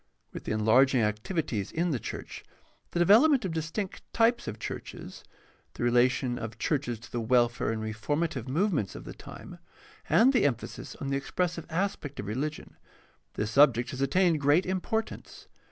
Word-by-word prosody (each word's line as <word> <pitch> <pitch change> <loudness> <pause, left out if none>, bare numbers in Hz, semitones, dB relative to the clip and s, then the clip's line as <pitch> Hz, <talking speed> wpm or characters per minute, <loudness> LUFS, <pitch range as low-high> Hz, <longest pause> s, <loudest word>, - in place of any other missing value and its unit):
With - - -8
the - - -3
enlarging 115 +4 +4
activities 105 - -2
in 170 +1 0
the 130 - -1
church, - - -7 0.5
the - - -5
develop 210 - +6
ment 275 -8 +2
of 175 - -2
distinct 165 +5 -4
types 230 +1 +2
of 110 - -4
churches, - - -7 0.5
the - - -4
relation 120 +1 +2
of 110 - -4
the 115 - -18
church 145 +3 0
to 120 -1 -6
the 120 - -2
welfare 120 0 +2
and 110 -1 -3
reformative 130 +5 -2
movements 155 - 0
of - - -8
the - - -8
time, - - -11 0.5
and 250 +5 +5
the 250 - +3
emphasis 130 -4 -3
on 140 - -5
the 135 - +1
expressive 170 +3 -2
aspect 165 -5 -3
of - - -4
religion, 140 +9 -4 0.6
this 105 +1 -2
subject 125 -2 +4
has 130 - -5
attained 165 +2 +2
great 145 +6 +4
importance. 190 +4 -3
140 Hz, 170 wpm, -28 LUFS, 120-175 Hz, 0.6 s, develop